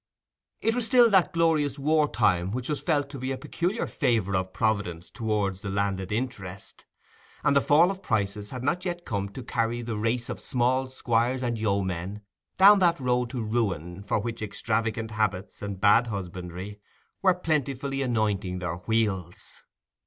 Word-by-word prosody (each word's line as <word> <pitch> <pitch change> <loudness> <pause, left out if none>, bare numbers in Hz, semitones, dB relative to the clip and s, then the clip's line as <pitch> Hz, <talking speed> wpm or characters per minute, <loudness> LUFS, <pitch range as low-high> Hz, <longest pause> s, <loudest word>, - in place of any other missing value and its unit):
It 225 - +2
was 240 -1 +2
still 240 -3 +6
that 190 -3 +4
glorious 155 -4 +2
war 150 +1 +2
time 90 -5 +2
which 125 +5 -4
was 150 - -1
felt 145 -4 +1
to 140 - -7
be 130 +2 -3
a 135 - -2
peculiar 175 - -2
favour 115 - 0
of 95 0 -1
Providence 100 -7 -1
towards 105 -4 -1
the 100 - -4
landed 95 -1 -1
interest, 105 -5 -5 0.6
and - - +3
the 140 - +5
fall 165 +7 +5
of 195 -1 -7
prices 105 - -1
had 125 -1 -6
not 175 +6 0
yet 175 -1 -4
come 100 -4 -2
to 125 +6 -8
carry 120 0 -1
the 115 -1 -3
race 115 +3 -1
of - - -5
small 130 +1 +1
squires 125 0 0
and 120 -2 -1
yeomen 100 -1 -2 0.3
down 200 +2 +8
that 170 -3 +3
road 125 -2 +1
to 120 -2 -3
ruin 100 -6 -2
for 100 - 0
which 115 +2 -4
extravagant 110 +1 -2
habits 105 -3 -2
and 100 -2 -5
bad 105 +4 +5
husbandry 95 0 -6 0.4
were 185 -2 +4
plentifully 140 -5 -1
anointing 105 -7 0
their 90 -2 -3
wheels. 95 -3 -2
115 Hz, 165 wpm, -27 LUFS, 100-140 Hz, 0.6 s, down